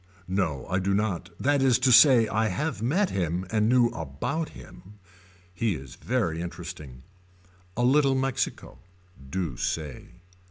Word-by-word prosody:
No 90 -8 -1
I 95 - -1
do 100 +1 0
not 100 -4 -1
that 140 +1 +2
is 130 -3 +4
to 130 0 +2
say 120 -2 +7
I 110 +1 0
have 140 - -3
met 180 - +1
him 90 0 -2
and 110 0 +2
knew 125 -1 +4
about 80 - -4
him. 100 +3 -14 0.6
He 105 +1 0
is 65 -2 -10
very 105 -10 -2
interesting. 85 -7 -8 0.7
A 120 - +1
little 135 +1 +4
Mexico. 135 -1 -2 0.5
Do 85 -6 -3
say. 75 -5 -4
105 Hz, 145 wpm, -26 LUFS, 85-130 Hz, 0.7 s, say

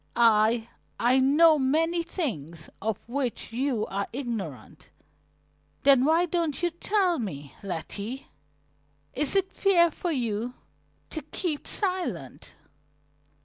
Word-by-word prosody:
I 225 0 +4 0.3
I 250 +3 +4
know 300 +4 +5
many 325 +6 +2
things 170 - -4
of 220 0 -1
which 250 -3 -3
you 245 -3 0
are 200 +1 -3
ignorant." 230 - -6 0.9
"Then 270 -2 +6
why 325 +3 +4
don't 335 -3 -1
you 345 - +2
tell 360 0 +1
me, 145 - -6
Letty? 200 +7 -5 0.9
Is 300 +5 +1
it 390 -1 +1
fair 345 -4 +4
for 350 +3 -3
you 240 -3 -2 0.6
to 315 - -4
keep 310 +1 -3
silent?" 370 -3 -3
265 Hz, 110 wpm, -27 LUFS, 220-335 Hz, 0.9 s, Then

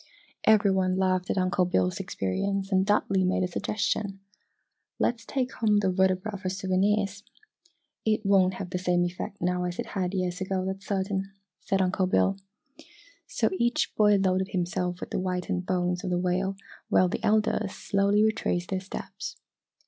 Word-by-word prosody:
Every 215 -2 +5
one 185 -1 +1
laughed 185 -1 +1
at - - 0
Uncle 185 0 +2
Bill's 95 - +1
experience 195 - -2
and 190 0 +4
Dudley 195 -2 +2
made 185 0 +1
a - - +1
suggestion. 200 +1 -2 0.8
"Let's 235 -1 0
take 260 -2 -1
home 210 -2 +2
the 195 -2 +2
vertebra 190 +2 +1
for 185 -1 -3
souvenirs!" 195 +2 0 0.8
"It 215 -1 +1
won't 190 -2 +4
have 185 -2 -6
the 180 - -1
same 180 -1 +2
effect 180 +3 -5
now 180 0 0
as 175 0 -4
it - - -3
had 185 -1 -1
years 180 0 -2
ago, 190 0 -1
that's 190 +1 -5
certain," 195 0 -1 0.3
said 195 -1 0
Uncle 185 0 +1
Bill. 195 +1 +2 0.9
So - - 0
each 240 0 +1
boy 210 -1 +5
loaded 190 -1 +1
himself 180 -1 -2
with - - -6
the - - -1
whitened 180 -1 -2
bones 180 -1 0
of - - -2
the 180 - +1
whale 185 +2 0 0.3
while 185 - +4
the 180 - -4
elders 215 -2 +1
slowly 200 +1 +2
retraced 215 -5 0
their 190 - 0
steps. 345 - -7
190 Hz, 165 wpm, -27 LUFS, 180-200 Hz, 0.9 s, Every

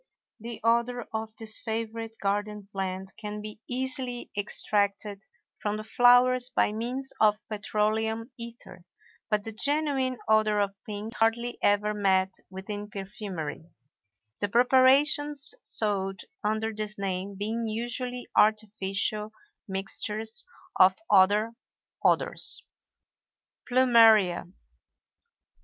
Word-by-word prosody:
The 230 +1 -7
odor 235 +1 +2
of 220 0 -4
this 220 -1 +1
favorite 225 0 -3
garden 205 +1 -2
plant 190 -1 -3
can 210 -1 -5
be 215 +1 -8
easily 255 -1 -3
extracted 205 0 0 0.4
from 210 0 -1
the 215 - -5
flowers 245 +2 +5
by - - +2
means 250 +5 -4
of 210 -1 +5
petroleum 220 +2 -1
ether; 235 -6 -11 0.5
but 210 -2 +1
the 225 - -5
genuine 275 +1 0
odor 215 -1 +4
of 200 -1 +1
pink 210 +2 -5
is - - -11
hardly 235 +2 +1
ever 205 +1 +3
met 190 -2 +2 0.2
with 190 0 -9
in 205 0 -5
perfumery; 195 -6 -6 0.8
the 205 - -1
preparations 270 - +3
sold 195 - -2 0.2
under 220 +1 0
this 215 0 -5
name 195 0 -3
being 220 +3 -2
usually 240 +3 -4
artificial 210 0 +1 0.4
mixtures 210 +3 -5 0.4
of 185 0 +7 0.2
other 205 +3 +5 0.5
odors. 435 - 0 1.0
PLUMERIA. 230 -7 +5
215 Hz, 110 wpm, -28 LUFS, 205-235 Hz, 1.0 s, of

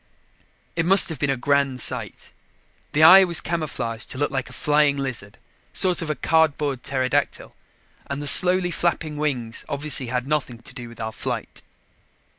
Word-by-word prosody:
It 165 - 0
must 195 0 +7
have 160 -5 -7
been 145 - -1
a 135 - -1
grand 140 0 0
sight. - - +1 0.6
The 155 - +2
eye 185 +4 +9
was 170 -3 +2
camouflaged 150 -9 -5
to - - -5
look 145 +1 -1
like 135 -2 -4
a - - -14
flying 145 +1 +1
lizard, 125 -7 -5 0.4
sort 180 -2 +2
of 165 - -5
a 155 - -1
cardboard 150 -5 0
pterodactyl, 130 -1 -2 0.5
and 140 0 -5
the 145 - -6
slowly 180 +3 +4
flapping 160 -3 -2
wings 125 -7 -4
obviously 140 -2 -2
had 125 +1 -3
nothing 140 -4 -3
to 115 +2 -15
do 120 -3 -9
with 115 - -15
our 110 0 -4
flight. - - -6
140 Hz, 170 wpm, -22 LUFS, 130-160 Hz, 0.6 s, eye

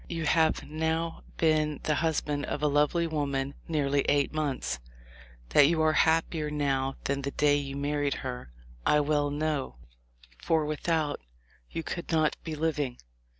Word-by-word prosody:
You 165 -2 -3
have 160 0 +2
now 160 +2 -1 0.2
been 155 -2 +2
the 155 - +1
husband 150 -2 0
of 150 - -3
a - - +4
lovely 150 +4 +2
woman 140 -3 -1
nearly 145 -3 +1
eight 145 0 +2
months. 135 - -2 0.7
That 145 -1 +6
you 165 +1 +1
are 155 0 +4
happier 160 -1 +2
now 135 -2 0
than 140 0 -1
the 140 - -2
day 145 0 +3
you 140 -1 -4
married 145 0 0
her, 125 - -5 0.3
I 150 - +4
well 145 0 +1
know, 145 - -2 0.7
for 160 -2 +2
without, 155 0 -1 0.5
you 165 - -4
could 170 - -5
not 155 -2 +2
be 160 -2 -4
living. 150 -5 -1
150 Hz, 150 wpm, -29 LUFS, 140-160 Hz, 0.7 s, That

